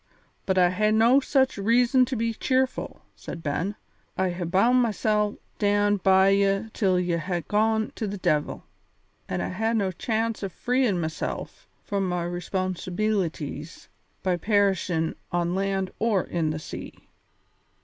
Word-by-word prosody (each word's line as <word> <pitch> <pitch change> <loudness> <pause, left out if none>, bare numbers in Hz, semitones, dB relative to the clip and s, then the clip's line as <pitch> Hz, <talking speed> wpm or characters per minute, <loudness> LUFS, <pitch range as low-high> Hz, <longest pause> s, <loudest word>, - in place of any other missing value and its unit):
"But 190 -1 +1
I 180 -1 +5
hae 215 +3 +1
no 230 +5 +5
such 265 -4 +1
reason 245 +4 +4
to 260 - -3
be 230 0 -1
cheerful," 260 +3 -1
said 165 - -8
Ben. 165 +8 -2 0.4
"I 185 -1 +1
hae 175 0 -4
bound 230 +9 +3
mysel' 210 -2 +1
to - - -18 0.2
stand 205 -1 +2
by 190 0 +5
ye 195 +2 +2
till 185 -4 +2
ye 175 -1 0
hae 175 +1 -2
gone 220 +3 +1
to 220 - -4
the 205 +1 -4
de'il, 150 -5 0 0.7
an' - - -2
I - - -2
hae 220 +5 -1
no 195 -4 +1
chance 225 +4 -2
o' 195 - -3
freein' 245 -1 0
mysel' 160 -1 -3 0.4
from 195 -2 -1
my 180 -1 -1
responsibeelities 175 -3 -3 0.3
by 185 -2 +1
perishin' 190 -5 +1 0.2
on 175 0 0
land 195 0 -1
or 215 -5 +2
in 165 -3 -1
the 155 - -2
sea." 155 - -8
195 Hz, 150 wpm, -26 LUFS, 180-220 Hz, 0.7 s, I